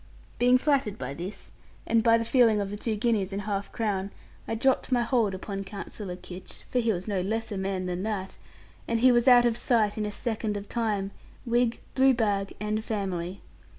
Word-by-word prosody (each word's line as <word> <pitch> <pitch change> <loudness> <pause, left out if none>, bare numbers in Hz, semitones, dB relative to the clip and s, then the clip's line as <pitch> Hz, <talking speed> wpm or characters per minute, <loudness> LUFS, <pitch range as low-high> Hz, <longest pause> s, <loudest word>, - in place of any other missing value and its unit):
Being 250 +1 +6
flattered 265 -7 +1
by 130 +1 -5
this, 180 +8 -7 0.3
and 230 0 +3
by 230 0 +5
the 230 - -2
feeling 230 -3 +4
of 200 -1 -2
the - - -3
two 220 +1 -2
guineas 210 -3 0
and 200 +1 -3
half 200 -1 -3
crown, 200 -4 -1 0.4
I 225 - -1
dropped 265 +3 +1
my 245 -1 +3
hold 230 -5 +1
upon 195 +1 -5
Counsellor 195 -1 -6
Kitch 180 0 -10
(for 250 - +2
he 230 -2 +2
was 185 -1 -3
no 200 -3 0
less 220 +4 -2
a - - -2
man 190 -1 -2
than 180 0 -2
that), 200 -2 -3 0.5
and 230 -1 0
he 255 +1 +7
was 240 0 +3
out 245 -1 +8
of 235 -1 +2
sight 225 -4 +1
in 210 - 0
a - - -4
second 215 -1 -2
of 200 0 -7
time, 210 -4 -1 0.3
wig, 240 0 +1
blue 265 0 +5
bag, 200 -4 0
and 210 +1 -1
family. 190 -4 -3
215 Hz, 205 wpm, -27 LUFS, 195-235 Hz, 0.5 s, out